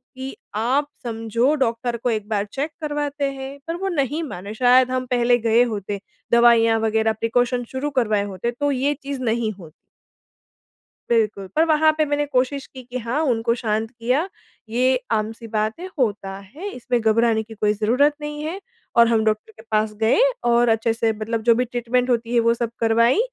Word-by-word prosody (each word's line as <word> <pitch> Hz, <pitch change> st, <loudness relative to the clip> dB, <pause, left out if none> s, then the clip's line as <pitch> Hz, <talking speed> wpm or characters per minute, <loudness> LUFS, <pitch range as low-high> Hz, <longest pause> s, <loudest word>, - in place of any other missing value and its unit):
कि 265 Hz, +1 st, -6 dB, 0.2 s
आप 260 Hz, +7 st, +1 dB, 0.2 s
समझो 230 Hz, +4 st, 0 dB
डॉक्टर 235 Hz, -2 st, -1 dB
को 245 Hz, +2 st, -2 dB
1 215 Hz, -2 st, -2 dB
बार 205 Hz, -1 st, 0 dB
चेक 280 Hz, +8 st, -4 dB
करवाते 290 Hz, -2 st, -2 dB
हैं, 270 Hz, +1 st, -8 dB
पर 330 Hz, -, -2 dB
वो 390 Hz, +2 st, -3 dB
नहीं 295 Hz, -1 st, -1 dB
माने। 200 Hz, -, -7 dB
शायद 255 Hz, +2 st, +4 dB
हम 255 Hz, 0 st, -1 dB
पहले 245 Hz, -1 st, +2 dB
गए 230 Hz, +2 st, +5 dB
होते, 205 Hz, -3 st, -3 dB, 0.3 s
दवाइयाँ 230 Hz, -1 st, +5 dB
वगैरह, 220 Hz, 0 st, +1 dB
प्रिकॉशन 245 Hz, +2 st, 0 dB
शुरू 270 Hz, +3 st, -2 dB
करवाए 210 Hz, -3 st, +1 dB
होते, 205 Hz, +4 st, -3 dB
तो 285 Hz, +4 st, -1 dB
ये 275 Hz, +2 st, +1 dB
चीज़ 275 Hz, -2 st, -4 dB
नहीं 225 Hz, -2 st, 0 dB
होती। 160 Hz, -3 st, -12 dB, 1.4 s
बिल्कुल, 210 Hz, -4 st, +1 dB
पर 320 Hz, +1 st, +4 dB
वहाँ 315 Hz, 0 st, +4 dB
पे 310 Hz, -, +3 dB
मैंने 290 Hz, 0 st, 0 dB
कोशिश 270 Hz, 0 st, 0 dB
की 260 Hz, -1 st, -11 dB
कि 250 Hz, +1 st, -6 dB
हाँ, 235 Hz, +6 st, -2 dB
उनको 230 Hz, -4 st, +1 dB
शांत 220 Hz, -1 st, -1 dB
किया, 250 Hz, +8 st, 0 dB, 0.4 s
ये 255 Hz, +2 st, +2 dB
आम-सी 225 Hz, +1 st, -2 dB
बात 215 Hz, +5 st, -1 dB
है 370 Hz, -, -6 dB
होता 205 Hz, -5 st, -1 dB
है, 275 Hz, -, -9 dB
इसमें 245 Hz, 0 st, -1 dB
घबराने 220 Hz, 0 st, +2 dB
की 225 Hz, -, -12 dB
कोई 210 Hz, -1 st, +1 dB
ज़रूरत 250 Hz, +8 st, +2 dB
नहीं 295 Hz, 0 st, -5 dB
है। 340 Hz, +5 st, -4 dB, 0.4 s
और 235 Hz, 0 st, +7 dB
हम 225 Hz, -2 st, +2 dB
डॉक्टर 215 Hz, 0 st, -1 dB
के 220 Hz, -, -16 dB
पास 215 Hz, 0 st, +1 dB
गए 220 Hz, +2 st, +2 dB, 0.3 s
और 235 Hz, 0 st, +4 dB
अच्छे 225 Hz, 0 st, +2 dB
से 225 Hz, 0 st, +1 dB
मतलब 220 Hz, +1 st, -3 dB
जो 230 Hz, -, +7 dB
भी 250 Hz, +1 st, +1 dB
ट्रीटमेंट 245 Hz, +1 st, -1 dB
होती 235 Hz, 0 st, 0 dB
है 235 Hz, -, +4 dB
वो 230 Hz, 0 st, +3 dB
सब 235 Hz, -1 st, -3 dB
करवाई। 230 Hz, -, +3 dB
235 Hz, 190 wpm, -22 LUFS, 220-265 Hz, 1.4 s, और